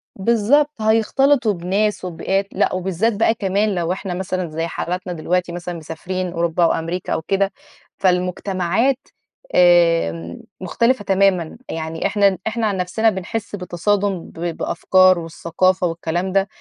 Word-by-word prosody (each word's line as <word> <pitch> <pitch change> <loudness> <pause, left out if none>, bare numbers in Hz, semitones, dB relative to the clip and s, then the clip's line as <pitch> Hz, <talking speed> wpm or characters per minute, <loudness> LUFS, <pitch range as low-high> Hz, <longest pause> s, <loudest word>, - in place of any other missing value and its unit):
بالضبط، 235 +7 +2
هيختلطوا 225 +2 +3
بناس 195 +3 -1
وببيئات، 190 +3 -1
لأ - - +1
وبالذات 190 +4 0
بقى 225 +2 +2
كمان 200 0 0
لو 170 -1 -1
إحنا 190 -1 -4
مثلًا 185 -1 -3
زي 165 +2 -3
حالاتنا 180 +2 -4
دلوقتي 175 +2 -1
مثلًا 175 +1 -5
مسافرين 175 +3 -5
أوروبا 170 0 0
أو 165 - +4
أمريكا 170 +2 -3
أو - - -1
كده، 195 +3 0 0.5
فالمجتمعات 185 +6 +1 0.6
آمم 165 - +3 0.2
مختلفة 230 +6 +1
تمامًا، 190 -4 +2
يعني 160 0 -4
إحنا 200 -2 +2
إحنا 220 0 0
عن 200 -2 -1
نفسنا 185 +5 +1
بنحس 205 +2 -4
بتصادُم 190 0 -1
بأفكار 180 +2 +2
والثقافة 175 +3 0
والكلام 170 +2 -2
ده، 195 +1 +2
185 Hz, 130 wpm, -20 LUFS, 170-205 Hz, 0.6 s, أو